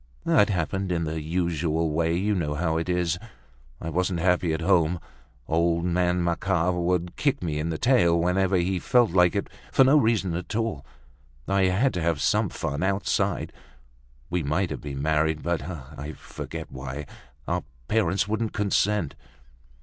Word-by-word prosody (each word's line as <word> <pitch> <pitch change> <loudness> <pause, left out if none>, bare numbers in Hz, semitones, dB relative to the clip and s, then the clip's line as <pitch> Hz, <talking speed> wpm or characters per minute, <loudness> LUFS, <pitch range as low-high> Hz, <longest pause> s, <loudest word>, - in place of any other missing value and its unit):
It 105 - +4
happened 95 +1 -1
in 85 -1 0
the 80 0 -3
usual 80 -1 0
way, 85 +2 +1
you 105 +3 +1
know 75 -6 -1
how 80 0 0
it 80 +2 -2
is. 90 -1 0 0.6
I 80 - -5
wasn't 90 +1 0
happy 90 -1 +2
at 80 - -1
home. 85 -1 +2 0.5
Old 85 +1 +1
man 90 0 +1
Macquart 90 +1 +1
would 90 0 -1
kick 140 -10 0
me 75 -3 -2
in 80 +2 -2
the 80 - -2
tail 85 -7 +3
whenever 90 +2 +2
he 90 +1 +1
felt 120 +2 +3
like 90 -1 +4
it, - - -1 0.2
for - - +6
no 135 +3 +5
reason 110 - +2
at 90 +5 -4
all. 110 -11 -1 0.6
I 100 -1 +3
had 100 +8 +2
to 90 - -2
have 80 -2 0
some 70 - +2
fun 70 +2 -3
outside. 95 +1 0 0.8
We 90 0 +1
might 80 +5 0
have - - -5
been 70 -2 -5
married, 80 0 +1
but—I 75 -3 -4
forget - - -8
why—our 65 +2 -6 0.2
parents 100 -2 +1
wouldn't 110 +1 -1
consent." 105 -4 +1
85 Hz, 160 wpm, -26 LUFS, 80-95 Hz, 0.8 s, for